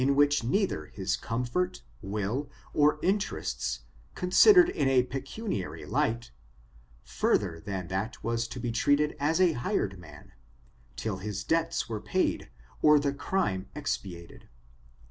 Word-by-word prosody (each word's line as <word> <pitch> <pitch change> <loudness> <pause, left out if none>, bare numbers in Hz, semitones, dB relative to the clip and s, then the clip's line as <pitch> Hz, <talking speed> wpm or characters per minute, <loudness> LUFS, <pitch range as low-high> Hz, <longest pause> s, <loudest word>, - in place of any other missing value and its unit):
which 145 -1 +3
neither 125 - 0
his 95 -1 -2
comfort, 125 +11 -2 0.2
will, 105 +7 -2 0.2
or 150 0 +4
interests, 190 - -1 0.3
considered 350 - +7
in 250 - 0
a 130 -2 +4
pecuniar]/ 135 - -5
light, 115 +1 -1 0.7
further 85 -5 0
than 95 -3 -4
that 95 +5 -4
was 115 0 -1
to 125 - -7
be 120 0 -2
treated 145 +5 +2
as 155 +4 +1
a 180 -2 +5
hired 100 -7 -1
man, 75 -4 -14 0.6
till 105 -4 -3
his 100 +1 -4
debts 165 0 0
were 110 -2 -4
paid - - -1 0.3
or 150 0 +7
the 140 -1 0
crime 105 - -1
expiated. 90 - -5
125 Hz, 125 wpm, -29 LUFS, 100-150 Hz, 0.7 s, considered